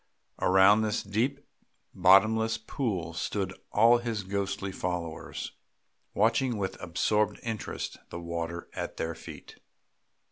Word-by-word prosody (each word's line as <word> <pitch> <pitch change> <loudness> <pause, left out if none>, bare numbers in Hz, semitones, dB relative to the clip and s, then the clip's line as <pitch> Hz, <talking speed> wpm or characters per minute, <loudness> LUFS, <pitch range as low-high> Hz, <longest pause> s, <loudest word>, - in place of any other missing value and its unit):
Around 95 +3 +6
this 110 0 0
deep 120 +8 -1 0.5
bottomless 110 +5 +5
pool 105 -7 -3
stood - - -2 0.2
all 115 +3 +6
his 115 -4 -3
ghostly 100 0 -2
followers, 90 -3 -4 0.6
watching 115 +3 +2
with 95 -2 -3
absorbed 105 +5 +1
interest 115 -2 -4
the 85 - -6
water 85 0 -4
at - - -5
their 80 +1 -2
feet. 80 - -11
100 Hz, 110 wpm, -29 LUFS, 90-110 Hz, 0.6 s, Around